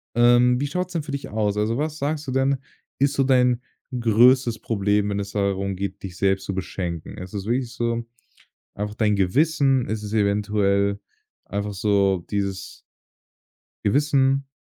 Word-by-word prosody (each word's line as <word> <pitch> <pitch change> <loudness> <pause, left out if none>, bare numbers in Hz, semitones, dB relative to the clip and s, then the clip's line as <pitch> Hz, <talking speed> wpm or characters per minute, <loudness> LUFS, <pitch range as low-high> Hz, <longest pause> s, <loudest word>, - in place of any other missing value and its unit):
Ähm, 120 +1 +5
wie 145 - -1
schaut's 180 +4 -3
denn 160 -3 -1
für 150 - -7
dich 140 0 -5
aus? 105 -1 -1
Also, 110 +3 0
was 155 +1 -2
sagst 150 0 -2
du - - -2
denn, 135 +1 +2 0.4
ist 140 +1 +2
so 135 - +2
dein 125 -2 +3 0.4
größtes 120 +1 +4
Problem, 105 -1 0
wenn 100 0 -1
es 100 0 -5
darum 100 -1 -1
geht, 100 +2 -5
dich 90 -3 -7
selbst 95 -1 +1
zu 100 - -3
beschenken? 85 -3 -5
Ist 90 0 -8
es 100 -1 -4
wirklich 120 +1 -1
so 115 0 -1 0.7
einfach 105 +1 -4
dein 105 -2 +1
Gewissen, 135 - +2
ist 110 0 -3
es 105 0 -6
eventuell 100 -1 +1 0.4
einfach 100 +1 -4
so 100 -3 +1
dieses 100 -2 -3 1.0
Gewissen? 135 +2 +2
110 Hz, 160 wpm, -23 LUFS, 100-135 Hz, 1.0 s, Ähm